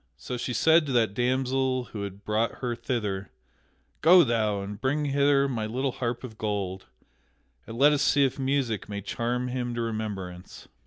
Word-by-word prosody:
So 125 - -5
she 125 +1 -3
said 160 +4 +4
to - - -2
that 115 -5 +2
damsel 130 +2 0
who 105 - -4
had 100 0 -7
brought 110 +2 0
her 120 -1 -1
thither: 105 -5 -3 0.7
"Go 175 +2 +8
thou 110 -5 0
and 100 +2 -7
bring 145 +3 0
hither 140 0 +3
my 115 -5 -2
little 130 +4 -1
harp 120 0 -3
of 110 -3 -9
gold, 100 -3 -3 0.8
and 115 - -7
let 145 +3 +6
us 145 - +1
see 145 -1 +4
if 135 - -2
music 130 -7 -1
may 100 0 -4
charm 120 +5 -2
him 125 -1 -3
to 120 - -2
remembrance." 105 -6 -5
120 Hz, 175 wpm, -27 LUFS, 105-135 Hz, 0.8 s, Go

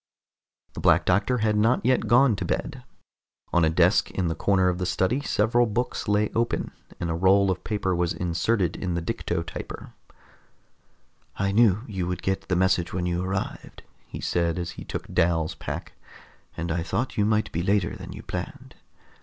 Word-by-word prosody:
The - - -7
Black - - +4
Doctor 100 +7 +2
had 110 -2 +1
not 115 +3 +2
yet 130 0 +2
gone 120 -1 +5
to - - -3
bed. - - -3 0.7
On 85 - +4
a 80 - +4
desk 85 +5 +3
in 90 -3 -1
the - - 0
corner 95 +3 +2
of 90 0 0
the 90 - -1
study 95 +10 +1
several 120 -2 +2
books 120 +4 -2
lay 105 +1 +2
open, 115 +1 -1 0.3
and 85 -1 -2
a - - 0
roll 95 +3 +4
of 90 - -4
paper 100 -3 -1
was 85 -1 0
inserted 90 +1 0
in 90 -2 -3
the 85 - -1
dicto 85 -5 -2
typer. - - -8 1.4
"I 100 0 0
knew 110 -1 +4
you 95 -6 -3
would 90 -1 -4
get 95 0 -1
the 90 - +1
message 90 -1 +1
when 90 0 -1
you 90 0 -1
arrived," 95 +1 -4 0.2
he - - -8
said 85 -1 0
as 85 -1 -3
he - - -9
took - - -5
Dal's 80 -2 +1
pack, - - -6 0.6
"and 85 0 -3
I 85 +1 0
thought 115 +9 -2
you 105 - +2
might 105 0 +1
be 85 - -2
later 95 -1 +1
than - - -9
you - - -9
planned. - - -6
95 Hz, 185 wpm, -25 LUFS, 85-105 Hz, 1.4 s, gone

